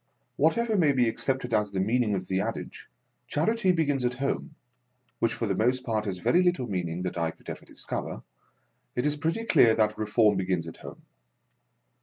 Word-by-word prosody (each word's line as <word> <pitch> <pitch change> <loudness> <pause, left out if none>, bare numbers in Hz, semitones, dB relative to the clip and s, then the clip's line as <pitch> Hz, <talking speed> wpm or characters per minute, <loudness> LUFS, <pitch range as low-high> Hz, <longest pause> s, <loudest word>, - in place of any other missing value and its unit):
Whatever 220 +7 +2
may 150 -5 +4
be 125 -3 +3
accepted 125 +1 -2
as 105 -1 +2
the 100 -1 -3
meaning 110 +1 +1
of 95 -1 -3
the 95 0 0
adage, - - -5 0.4
Charity 190 +5 +1
begins 145 -6 +1
at 125 0 0
home 140 +3 -3 0.3
— 125 0 -44
which 115 - +2
for 115 - -2
the 100 - 0
most 125 +6 +1
part 110 -2 -1
has 95 -3 -3
very 170 - +3
little 175 -8 +1
meaning 90 -4 -3
that 90 -1 -3
I 85 -1 +1
could - - -14
ever - - -9
discover - - -5 0.3
— - - -45
it 125 - 0
is 150 0 +2
pretty 165 +9 -1
clear 115 - +5
that 110 -1 +3
Keforni 105 -1 +2
begins 90 -3 -1
at 80 - -9
home. - - -11
120 Hz, 195 wpm, -27 LUFS, 100-145 Hz, 0.4 s, clear